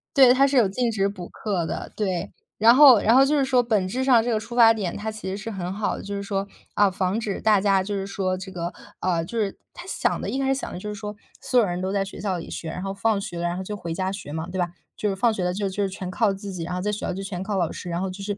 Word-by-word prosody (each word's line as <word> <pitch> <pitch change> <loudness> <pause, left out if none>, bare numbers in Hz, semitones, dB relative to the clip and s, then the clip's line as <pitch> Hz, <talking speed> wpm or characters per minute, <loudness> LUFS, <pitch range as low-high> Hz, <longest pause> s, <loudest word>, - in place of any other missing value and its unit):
对， 260 -3 +8
它 275 +2 +4
是 275 - -1
有 245 -4 +6
禁 240 +4 0
止 200 -3 +1
补 180 -3 -8
课 195 -6 -2
的， - - -5
对， 190 -3 -2 0.3
然 230 +2 +7
后 265 -5 +9
然 225 - +4
后 265 +2 +7
就 295 +2 +2
是 275 - +3
说 260 -2 +3
本 215 -5 +1
质 245 +8 -2
上 250 -4 +5
这 240 - -1
个 220 - +1
出 230 +2 -8
发 230 -2 +7
点， 195 -6 -3
它 220 +1 -4
其 215 -2 -8
实 190 - -3
是 210 +2 -6
很 185 -2 -4
好 210 +1 -1
的， - - -8
就 200 0 -5
是 200 - -3
说， 195 0 -2 0.3
啊， 205 -1 +5
防 185 +3 -1
止 205 -3 -3
大 210 -2 +4
家 195 -1 +3
就 205 +1 -4
是 195 0 -3
说 185 -2 -1
这 190 +1 -8
个 175 -2 -4 0.3
呃， 170 -3 0
就 230 +6 -6
是 205 -3 -1 0.2
它 355 - -10
想 - - -1
的 - - -3
一 265 - -2
开 270 - 0
始 270 - +2
想 - - -5
的 - - -6
就 210 - -7
是 210 - -4
说 210 0 -7 0.2
所 250 - +2
有 225 - +4
人 180 -1 -3
都 190 - -2
在 195 -1 0
学 195 - -9
校 190 -3 -1
里 165 - -8
学， 160 - -5
然 180 - -5
后 195 0 -3
放 205 +1 +1
学 175 -3 -6
了， 170 - -3
然 175 - -3
后 - - -3
就 210 +2 -5
回 170 -5 -5
家 185 +2 -1
学 195 -7 -6
嘛， 160 +2 -4
对 185 - -5
吧， 175 -1 0 0.3
就 210 - -1
是 195 - -1
放 225 +3 +3
学 185 - -2
了 180 - 0
就 200 +1 -1
就 195 +1 -2
是 195 - 0
全 185 -1 -6
靠 205 +2 +2
自 195 0 -7
己， 175 -2 -4
然 180 +2 -4
后 180 - -2
在 210 +3 -1
学 205 - -3
校 - - -2
就 195 - -5
全 190 -1 -5
靠 205 -1 -2
老 170 -3 +1
师， 180 - -7
然 170 +1 -2
后 190 - -1
就 195 +2 -7
是 205 0 -3
200 Hz, 355 characters per minute, -24 LUFS, 185-220 Hz, 0.3 s, 后